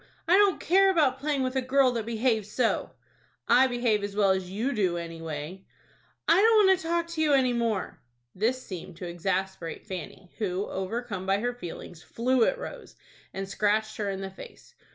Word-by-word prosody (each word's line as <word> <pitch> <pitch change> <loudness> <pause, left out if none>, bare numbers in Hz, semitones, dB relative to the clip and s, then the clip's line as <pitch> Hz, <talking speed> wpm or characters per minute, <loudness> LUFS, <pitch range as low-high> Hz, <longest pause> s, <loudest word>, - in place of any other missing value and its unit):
I 350 - +6
don't 400 -3 +4
care 390 +3 +4
about 290 -8 +2
playing 285 -1 0
with 255 0 -2
a 265 - +2
girl 260 0 +3
that 230 -2 -3
behaves 225 -2 0
so." 240 0 0 0.6
"I 250 +3 +6
behave 240 -4 0
as 200 0 -4
well 200 -2 +4
as 190 -1 -1
you 225 +8 -2
do, 185 -6 0
anyway." 165 +1 -6 0.6
"I 340 +4 +5
don't 440 -1 +6
want 380 -1 +5
to 325 - -7
talk 340 0 +1
to 330 -2 -3
you 300 -2 +3
any 255 -3 +3
more." 230 -5 -2 0.3
This 245 +6 -1
seemed 180 -2 -8
to 180 - -6
exasperate 180 0 -3
Fanny, 185 -1 -8
who, 195 -2 -1
overcome 190 0 -4
by 195 +1 +3
her 245 +4 -2
feelings, 175 -6 -9
flew 245 +3 +1
at - - 0
Rose, - - -9 0.4
and 195 0 -5
scratched 215 +2 0
her 205 -2 -2
in 195 0 -4
the 190 0 -5
face. 190 - -13
220 Hz, 190 wpm, -27 LUFS, 190-265 Hz, 0.6 s, I